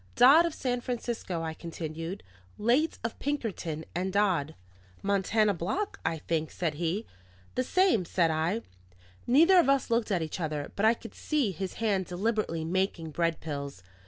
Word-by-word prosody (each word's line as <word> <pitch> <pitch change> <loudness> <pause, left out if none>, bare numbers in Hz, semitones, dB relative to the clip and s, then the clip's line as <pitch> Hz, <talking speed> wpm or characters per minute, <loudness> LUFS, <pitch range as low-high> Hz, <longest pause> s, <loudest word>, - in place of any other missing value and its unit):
"Dodd, 290 +7 +7
of 330 - -5
San 245 -2 -1
Francisco," 235 -8 -3
I 160 0 -3
continued. 165 +2 -6 0.3
"Late 245 +9 +2
of 230 - -4
Pinkerton 205 - -3
and 185 +3 -1
Dodd." 185 -7 +1 0.5
"Montana 200 +2 +2
Block, 205 - -3
I 160 0 0
think?" 160 0 -2
said 165 -4 -2
he. 175 +8 -2 0.5
"The 255 - 0
same," 360 - +3
said 170 -1 +2
I. 165 +8 0 0.6
Neither 330 +9 +6
of 330 - +4
us 275 -3 +2
looked 230 -1 +2
at 180 -5 +1
each 160 +4 -5
other; 150 -3 -3
but 210 +2 +3
I 230 - +5
could 230 -2 -11
see 290 -9 0
his 185 +2 -4
hand 200 -5 0
deliberately 185 -3 -1
making 175 -2 -1
bread 165 +1 0
pills. 140 - -5
190 Hz, 160 wpm, -29 LUFS, 165-235 Hz, 0.6 s, Dodd